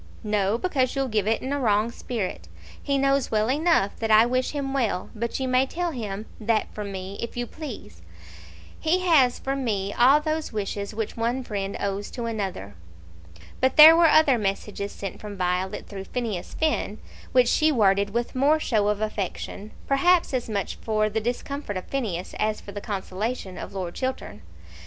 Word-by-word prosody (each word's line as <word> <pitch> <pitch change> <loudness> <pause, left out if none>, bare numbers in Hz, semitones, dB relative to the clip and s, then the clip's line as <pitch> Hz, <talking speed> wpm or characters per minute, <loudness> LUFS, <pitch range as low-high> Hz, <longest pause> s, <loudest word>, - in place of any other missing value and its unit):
"No; 210 0 +1
because 260 -5 0
you'll 270 -1 0
give 215 -2 0
it 225 - +1
in 265 +2 -2
a 285 - -1
wrong 215 -2 +2
spirit. 190 - -4 0.3
He 280 -1 0
knows 275 -1 +2
well 215 +2 +1
enough 300 - +2
that 225 - -2
I 215 +1 +7
wish 255 +1 0
him 280 -2 -3
well; 225 -9 -1
but 235 +3 -3
you 260 - -1
may 255 +1 +3
tell 345 +4 -2
him 215 -6 -5
that 220 0 0
from 205 -1 -5
me, 190 +1 -6
if 235 +1 -5
you 245 - -1
please. 240 - -9 0.8
He 350 +4 +1
has 300 -9 +4
from 270 0 -3
me 200 -4 -1
all 265 +5 +6
those 310 0 -2
wishes 205 -1 -4
which 220 -1 -3
one 235 +3 -1
friend 200 -4 -4
owes 200 0 -2
to 240 - -3
another." 195 - -4 0.9
But 260 0 +2
there 315 +2 +11
were 335 -1 +6
other 290 -6 +5
messages 200 0 -3
sent 195 - -7
from 205 -1 -7
Violet 180 +1 -1
through 195 -2 -7
Phineas 225 -7 -4
Finn 305 -9 0 0.3
which 250 -1 +4
she 310 +5 +3
worded 200 -5 +3
with 235 +3 -2
more 285 +4 +3
show 215 -8 +1
of 210 0 0
affection, 210 0 -4 0.2
perhaps 335 +4 +3
as 250 -3 -1
much 200 -3 -2
for 215 -1 0
the 220 +1 -1
discomfort 245 -1 -3
of 185 - -6
Phineas 205 -10 -3
as 215 0 0
for 200 - -10
the 205 0 -6
consolation 200 0 -4
of - - -8
Lord 180 -3 -4
Chiltern. 260 0 -4
225 Hz, 185 wpm, -25 LUFS, 200-265 Hz, 0.9 s, there